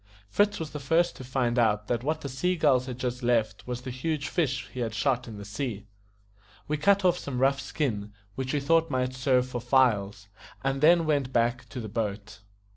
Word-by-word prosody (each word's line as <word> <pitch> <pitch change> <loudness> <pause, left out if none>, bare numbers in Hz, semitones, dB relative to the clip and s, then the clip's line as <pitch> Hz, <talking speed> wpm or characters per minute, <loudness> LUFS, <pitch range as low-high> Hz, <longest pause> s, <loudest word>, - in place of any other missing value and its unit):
Fritz 205 0 +2
was 160 -2 -5
the 150 - -5
first 165 +5 +2
to - - -8
find 125 -1 0
out 105 -2 +2
that 120 +1 -1
what 155 +3 -1
the - - -4
sea 180 +8 0
gulls 140 -6 +3
had 125 -2 -5
just 125 0 -3
left 115 -4 0
was 125 0 -4
the 130 - -5
huge 140 +3 -2
fish 135 -6 -1
he 130 - -6
had 115 -3 -2
shot 125 0 0
in 110 -2 -8
the 100 - -8
sea. 105 -1 -4 0.8
We 150 - 0
cut 200 +5 +3
off 180 -1 +3
some 140 -3 -5
rough 135 +2 +3
skin, 105 -9 -2 0.2
which 130 +4 -3
we 150 - +1
thought 165 +3 +3
might 130 -1 -1
serve 130 -1 +2
for 125 -1 -4
files, 105 -6 +2 0.4
and 135 0 -1
then 165 +2 +6
went 140 -4 0
back 120 0 0
to 120 - -6
the 110 - -5
boat. 105 -1 -4
130 Hz, 210 wpm, -27 LUFS, 120-145 Hz, 0.8 s, then